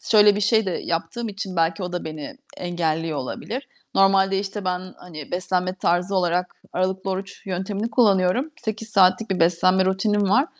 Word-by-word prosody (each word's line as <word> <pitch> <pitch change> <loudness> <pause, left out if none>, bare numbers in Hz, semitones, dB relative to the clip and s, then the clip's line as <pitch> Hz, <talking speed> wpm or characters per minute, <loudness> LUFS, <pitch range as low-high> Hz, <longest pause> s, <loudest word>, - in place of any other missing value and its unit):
şöyle 210 -2 +5
bir - - -1
şey 220 0 +3
de - - 0
yaptığım 215 +8 -3
için 195 -2 -6
belki 165 +2 +1
o 180 -1 -4
da 180 - -3
beni 155 - -7 0.2
engelliyor 165 -3 -2
olabilir. 240 - -5 0.3
Normalde, 195 0 +4
işte, 200 0 -4
ben, 185 0 -3
hani, 155 -5 -10
beslenme 185 0 -1
tarzı 180 +1 0
olarak 180 0 0 0.2
aralıklı 190 +1 -1
oruç 195 +2 -6
yöntemini 195 +4 -3
kullanıyorum. 215 +4 +3
8 220 -1 -5
saatlik 195 +1 +3
bir 190 - -1
beslenme 185 +3 +3
rutinim 200 +2 +1
var. 260 +8 +4
190 Hz, 165 wpm, -23 LUFS, 180-205 Hz, 0.3 s, şöyle